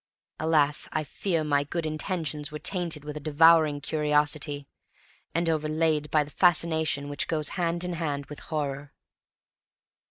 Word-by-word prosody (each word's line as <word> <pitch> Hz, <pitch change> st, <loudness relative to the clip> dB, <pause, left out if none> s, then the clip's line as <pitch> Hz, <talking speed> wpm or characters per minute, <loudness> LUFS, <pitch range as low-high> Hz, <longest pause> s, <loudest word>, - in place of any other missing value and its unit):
Alas! 155 Hz, -2 st, +3 dB
I 155 Hz, -, -1 dB
fear 165 Hz, +3 st, -2 dB
my 145 Hz, -2 st, +1 dB
good 165 Hz, +3 st, -4 dB
intentions 155 Hz, -2 st, -3 dB
were 150 Hz, -, -5 dB
tainted 170 Hz, -3 st, 0 dB
with 150 Hz, 0 st, -6 dB
a -, -, -4 dB
devouring 155 Hz, 0 st, +4 dB
curiosity, 150 Hz, -1 st, 0 dB, 0.7 s
and 170 Hz, 0 st, +1 dB
overlaid 155 Hz, -1 st, 0 dB
by 155 Hz, -1 st, +3 dB
the 145 Hz, -, -13 dB
fascination 160 Hz, -4 st, +2 dB
which 145 Hz, 0 st, -2 dB
goes 155 Hz, -2 st, -1 dB
hand 170 Hz, -1 st, -1 dB
in 180 Hz, 0 st, -3 dB
hand 145 Hz, -4 st, -3 dB
with 150 Hz, -, -10 dB
horror. 145 Hz, -3 st, -4 dB
155 Hz, 140 wpm, -27 LUFS, 145-165 Hz, 0.7 s, devouring